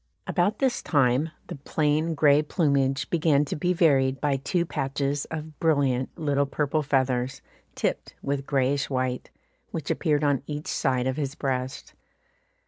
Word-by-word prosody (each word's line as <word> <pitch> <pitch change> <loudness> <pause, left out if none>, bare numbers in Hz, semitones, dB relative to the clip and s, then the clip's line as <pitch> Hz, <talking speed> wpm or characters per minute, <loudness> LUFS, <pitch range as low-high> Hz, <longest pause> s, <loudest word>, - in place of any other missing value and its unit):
About 180 +4 +1
this 265 -3 +1
time 140 0 +2 0.2
the - - -7
plain 155 +3 0
grey 145 0 +5
plumage 140 -4 +1
began 155 -3 +3
to - - -4
be 180 +4 0
varied 135 -7 +3
by 145 -2 +1
two 170 +6 -1
patches 140 -1 -2
of 155 -1 -7
brilliant 140 -5 +2
little 140 -3 +1
purple 150 +2 0
feathers, 130 -2 0 0.3
tipped - - -2
with 140 -1 -2
greyish 135 0 +1
white, 130 -2 -2 0.4
which 155 -4 -4
appeared 150 -3 +1
on 145 -2 +2
each 150 0 -5
side 130 -2 0
of 130 +1 -1
his 145 -1 -3
breast. 130 -2 -3
140 Hz, 145 wpm, -26 LUFS, 135-155 Hz, 0.4 s, grey